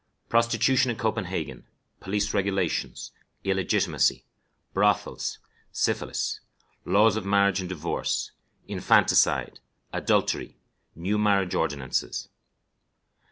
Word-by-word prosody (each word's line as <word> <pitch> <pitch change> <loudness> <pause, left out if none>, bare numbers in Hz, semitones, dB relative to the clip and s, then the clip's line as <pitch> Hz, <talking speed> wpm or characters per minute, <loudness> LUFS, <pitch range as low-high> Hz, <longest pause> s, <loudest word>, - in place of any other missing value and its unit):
Prostitution 120 +3 +3
in 120 - -2
Copenhagen. 110 -4 -3 0.4
Police 105 +2 -1
Regulations. 95 -3 -1 0.3
Illegitimacy. 95 -1 +1 0.5
Brothels. - - +1 0.3
Syphilis. - - -1 0.5
Laws 105 +2 +4
of 110 - -2
Marriage 100 -1 +3
and 90 -1 -4
Divorce. 85 -2 -2 0.4
Infanticide. - - +3 0.3
Adultery. - - 0 0.4
New 95 +6 -1
Marriage 100 -3 +2
Ordinances. 65 -3 -2
100 Hz, 80 wpm, -26 LUFS, 95-110 Hz, 0.5 s, Laws